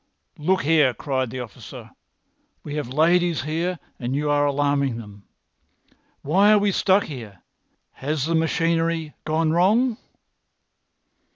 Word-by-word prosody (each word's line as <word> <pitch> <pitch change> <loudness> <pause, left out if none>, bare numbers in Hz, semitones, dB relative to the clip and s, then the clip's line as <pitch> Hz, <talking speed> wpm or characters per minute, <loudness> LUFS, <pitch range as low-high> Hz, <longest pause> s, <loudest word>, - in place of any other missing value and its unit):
"Look 185 +5 +1
here!" 150 -4 +3
cried 130 -4 -2
the 130 +2 -5
officer. 115 -5 -10 0.7
"We 145 - -7
have 150 -5 -3
ladies 170 +3 +2
here 165 +4 -2 0.2
and 125 +1 -3
you 150 +1 0
are 145 0 +2
alarming 140 -3 0
them. 105 -3 -11 1.0
Why 195 +8 +4
are - - +6
we 205 0 +2
stuck 195 +1 +3
here? 110 - -9 0.5
Has 145 0 -3
the 165 - -1
machinery 165 -1 0
gone 155 +1 +1
wrong?" 215 +8 +2
155 Hz, 125 wpm, -23 LUFS, 140-170 Hz, 1.0 s, are